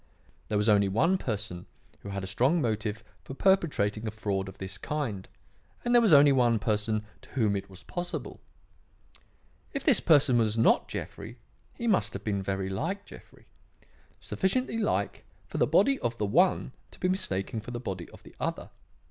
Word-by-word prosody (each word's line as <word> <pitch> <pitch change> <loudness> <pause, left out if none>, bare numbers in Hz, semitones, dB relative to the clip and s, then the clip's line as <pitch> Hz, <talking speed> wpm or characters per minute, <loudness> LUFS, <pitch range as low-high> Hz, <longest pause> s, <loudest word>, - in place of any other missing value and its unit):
There 105 - 0
was 105 +1 +1
only 100 -2 +4
one 165 - +2
person 105 - -4 0.3
who 100 - -9
had 100 -1 -4
a - - -3
strong 125 - +2
motive 110 -3 -2 0.2
for 135 - -8
perpetrating 125 - +1
a - - 0
fraud 100 -3 -2
of 95 - -12
this 95 0 -6
kind, 120 -11 -3 0.6
and 240 - +2
there 240 - +7
was 225 - +3
only 145 -1 +8
one 120 -3 +3
person 105 0 -1 0.2
to - - -17
whom 110 -6 +1
it 100 0 -4
was 95 -1 -13
possible. 175 -1 -5 1.3
If 275 - -3
this 275 -9 +5
person 145 -6 +4
was 110 -1 +1
not 115 - +4
Jeffrey, 115 +3 -7 0.4
he 235 - -5
must 215 -5 +2
have 100 - -6
been 100 -2 -1
very 95 0 -2
like 165 - -3
Jeffrey; - - -15 0.7
sufficiently 230 +4 -1
like 210 - -1 0.2
for - - -5
the - - +4
body 275 -1 +3
of 115 0 -2
the 105 - 0
one 170 - +2 0.2
to - - -16
be 180 - +1
mistaken 145 - -2
for 115 - -10
the 120 0 -4
body 95 -7 -5
of - - -16
the - - -15
other. - - -3
115 Hz, 180 wpm, -28 LUFS, 100-170 Hz, 1.3 s, only